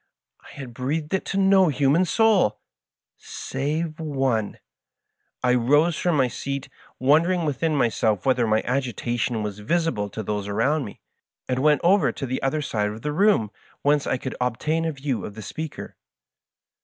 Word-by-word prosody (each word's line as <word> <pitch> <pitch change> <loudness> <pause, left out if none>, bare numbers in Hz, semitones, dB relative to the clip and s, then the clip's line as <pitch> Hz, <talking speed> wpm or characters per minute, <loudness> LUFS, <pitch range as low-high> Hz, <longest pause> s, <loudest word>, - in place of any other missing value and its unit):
I - - -17
had 130 -4 -9
breathed 150 +7 -3
it 190 - 0
to 195 - -3
no 195 -1 +5
human 145 +4 +2
soul 205 - +3 0.4
— - - -68
save 155 +4 -4
one! 135 -8 -1 0.9
I 125 0 +3
rose 145 +7 +3
from 175 -2 0
my 130 -2 +3
seat, 140 +3 -5 0.3
wondering 165 +6 +3
within 155 +2 0
myself 110 -6 +1
whether 125 -3 +2
my 110 0 +2
agitation 120 -3 -1
was 105 -1 -5
visible 135 -4 -1
to 110 - -6
those 105 0 -3
around 135 +9 0
me, 100 - -11 0.5
and 130 0 -1
went 150 +1 +3
over 190 +3 +4
to 135 - -5
the 130 0 -3
other 150 +3 0
side 105 -6 -1
of 110 +2 -8
the 150 - -2
room 190 - +3 0.3
whence 145 0 +2
I 130 - +1
could 130 +1 -6
obtain 150 +7 0
a 165 - 0
view 135 -4 -3
of 105 - -7
the 110 - -8
speaker. 155 +9 -7
135 Hz, 165 wpm, -24 LUFS, 115-160 Hz, 0.9 s, no